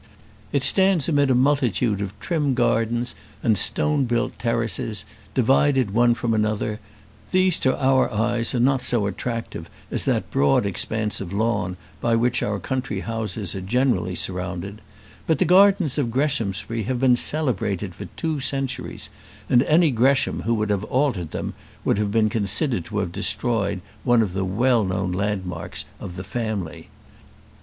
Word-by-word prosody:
It - - +1
stands 190 -5 +4
amid 145 -4 +2
a 130 - +3
multitude 125 -6 +1
of 100 0 -6
trim 150 -6 -1
gardens 120 -2 0 0.3
and 110 - +3
stone 145 +7 +4
built 120 0 -2
terraces, 115 -3 -1 0.3
divided 130 -2 +3
one 120 +1 +4
from 115 0 -1
another: 105 0 -1 0.5
these 185 -2 +3
to 130 - +1
our 130 -1 +3
eyes 115 +3 +1
are - - +1
not 130 +2 +2
so 115 -5 0
attractive 115 -5 -5 0.2
as - - +1
that - - -1
broad 70 +7 +2
expanse 105 +2 -1
of 95 -3 -6
lawn 100 -4 -1 0.2
by 115 -1 +2
which 125 +2 +1
our 105 0 -1
country 110 -1 -3
houses 110 -4 -3
are 95 - -5
generally 95 -4 0
surrounded; 90 +3 -3 0.5
but 160 - +2
the 185 - +2
gardens 185 -4 +4
of 130 -5 0
Greshamsbury 115 -5 -1
have 130 +1 -2
been 130 -1 +4
celebrated 110 - -1
for - - -8
two 160 -3 -2
centuries, 135 0 -3 0.4
and 120 - +6
any 155 +3 +3
Gresham 130 +3 +2
who 115 +1 0
would 105 -1 -1
have 100 -1 0
altered 125 - 0
them - - -4 0.3
would - - +2
have 105 -1 0
been 110 0 +3
considered 105 - -1
to 105 - -6
have 95 -4 -1
destroyed 100 -2 -1 0.2
one 120 -3 +4
of 95 -4 -4
the 95 0 -1
well 115 +5 +2
known 95 -1 -2
landmarks 95 -1 -3
of 90 - -8
the 95 - -6
family. 105 -5 -4
115 Hz, 160 wpm, -23 LUFS, 100-130 Hz, 0.5 s, and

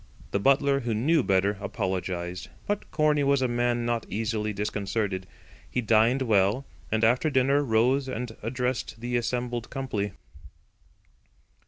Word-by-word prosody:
The 100 - +1
butler, 140 +4 +3
who 120 -4 -2
knew 150 +8 +3
better, 100 -2 +1
apologised; 90 -2 -3 0.2
but 205 0 -2
Corney 150 -1 +2
was 140 -1 +3
a - - +3
man 120 0 0
not 120 -1 -1
easily 110 0 -1
disconcerted. 100 -1 -2 0.4
He - - -1
dined 115 +4 +3
well, 105 +3 +2 0.3
and 110 +1 +1
after 125 +7 +3
dinner 135 +1 +3
rose 130 +3 +2
and 125 -2 -4
addressed 125 0 -2
the 120 +1 -3
assembled 120 0 -2
company. 105 -8 -3
120 Hz, 135 wpm, -27 LUFS, 105-130 Hz, 0.4 s, butler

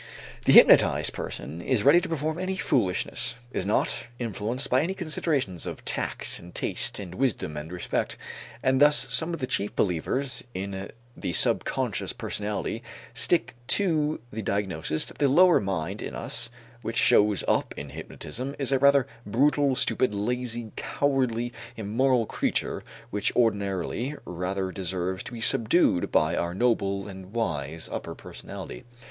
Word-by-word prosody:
The - - +5
hypnotized - - +7
person 75 +8 -6
is 120 0 +1
ready 165 +7 +6
to 185 - -5
perform 160 +1 -2
any 185 +1 -2
foolishness, 120 - 0 0.2
is 95 - -2
not 105 - 0
influenced 120 +3 -2
by 130 +1 +3
any 180 +5 -2
considerations 155 - -1
of - - -7
tact - - -1
and 90 0 -13
taste - - +1
and 95 -4 -7
wisdom 115 - -1
and 75 +3 -6
respect, 90 -1 -2 0.5
and 130 +1 +2
thus 150 0 +5
some 160 +1 +3
of 170 - -4
the 130 - -1
chief 105 -4 -2
believers 105 - -1
in 95 +1 -4 0.3
the - - -3
subconscious - - +1
personality 105 +2 -3 0.3
stick 125 +9 +2
to 155 -6 +2
the 110 - -3
diagnosis 95 -7 0
that - - -14
the 145 - +4
lower 175 +6 +6
mind 95 0 -3
in - - -5
us 120 0 -2 0.3
which 115 - -4
shows 105 -2 +4
up - - +1
in 70 - -6
hypnotism 125 - -6
is 135 -2 -1
a 135 - +3
rather 140 -1 +5 0.2
brutal, 140 +4 +3
stupid, 130 -4 +2
lazy, 120 +1 -2
cowardly, 125 -4 0 0.2
immoral 115 +3 +1
creature - - -1 0.3
which 105 0 0
ordinarily 105 - 0
rather 95 +2 -3
deserves 95 0 -3
to - - -8
be 115 - -6
subdued 110 - +3
by 80 +1 +3
our 85 +1 -2
noble 100 -4 +1
and 95 0 -10
wise 80 -9 -2
upper - - -5
personality. - - -9
115 Hz, 150 wpm, -26 LUFS, 95-135 Hz, 0.5 s, hypnotized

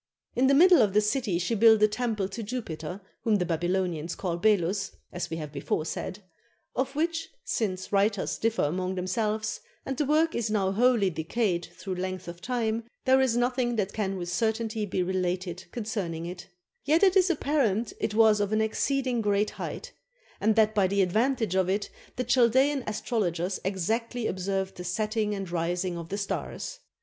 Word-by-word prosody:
In 255 +2 +4
the 275 - +5
middle 355 +4 +7
of 205 -3 +2
the 210 - +5
city 210 -4 0
she 185 +6 -1
built 220 0 +6
a - - +8
temple 215 -2 -1
to 200 +4 -6
Jupiter, 195 -6 -5 0.2
whom 220 -2 +3
the 180 -3 +1
Babylonians 175 -1 -1
call 175 -3 -2
Belus, 195 0 +1 0.2
as 175 - -3
we 165 - -3
have 150 -2 -6
before 155 +1 -2
said, 195 +4 -5 0.5
of 270 +2 -1
which, 330 +2 -1
since 190 - -2
writers 200 0 +1
differ 225 0 +1
amongst 185 +5 -1
themselves, 215 +4 -1 0.3
and 270 - -2
the 295 - 0
work 315 +2 +3
is 230 -2 -1
now 200 -3 +1
wholly 225 -2 +3
decayed 175 +2 -1
through 190 0 -4
length 185 0 -4
of 170 0 -8
time, 230 0 -1 0.2
there 260 0 +5
is 250 -3 +2
nothing 245 0 +1
that 205 -3 -1
can 195 -3 -2
with 175 -1 -4
certainty 220 +1 -1
be 185 -1 0
related 180 0 -2
concerning 200 -8 -3
it; 175 +1 -7 0.4
yet 315 +6 +3
it 380 -1 +5
is 380 -1 +5
apparent 270 - +1
it 215 -1 -2
was 220 -1 +5
of 205 0 -1
an 215 - +2
exceeding 250 +3 0
great 205 0 +1
height, - - -6 0.5
and 220 +1 +2
that 220 -1 +4
by 200 -3 +3
the 200 +1 +2
advantage 220 +2 +1
of 190 -1 +2
it 200 +2 -1 0.2
the 250 - -1
Chal 245 -2 +4
daean 270 +3 +2
astrologers 190 -4 -1
exactly 225 +6 -1
observed 190 0 -2
the 180 - -6
setting 210 +3 -1
and 195 -3 -5
rising 175 +1 -1
of 170 -1 -7
the 200 - -3
stars. 210 - -4
210 Hz, 180 wpm, -28 LUFS, 185-235 Hz, 0.5 s, a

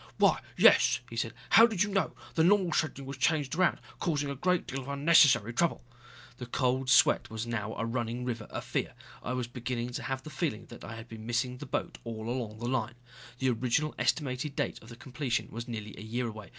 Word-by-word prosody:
"Why, - - +4 0.2
yes," - - +6
he - - -6
said. 115 0 -2 0.2
"How 225 +2 +9
did 210 -5 +1
you 205 - -3
know? 195 -1 0 0.2
The 160 - +3
normal 185 0 +4
scheduling 140 -3 -1
was 135 0 -6
changed 145 -1 +1
around, 185 +3 +2 0.2
causing 145 -4 -1
a - - -4
great 180 +5 +1
deal 135 - -4
of 130 - -11
unnecessary 140 -6 +5
trouble." 170 +2 +1 0.5
The 125 - -7
cold 130 +1 0
sweat 130 - +5
was 110 +1 -4
now 110 -2 -3
a 115 - -2
running 120 +1 -2
river 120 -2 -3
of - - -6
fear. - - -2 0.3
I 125 - -3
was 125 -1 -1
beginning 120 0 -4
to - - -4
have 130 +1 -3
the 155 - -9
feeling 150 -12 -2
that 120 - -11
I 110 - -7
had 115 +1 -9
been 110 -1 -9
missing 125 +2 -1
the - - -7
boat - - -3
all 110 -1 -6
along 120 -3 -3
the 120 +2 -4
line. 120 -2 -1 0.4
The 130 0 +1
original 125 +6 0
estimated 140 -1 0
date - - -2
of 115 +1 -12
completion 125 0 -2
was 115 +2 -6
nearly 110 -3 -6
a - - -10
year 120 +3 -2
away. 105 -3 -8
125 Hz, 215 wpm, -30 LUFS, 115-145 Hz, 0.5 s, How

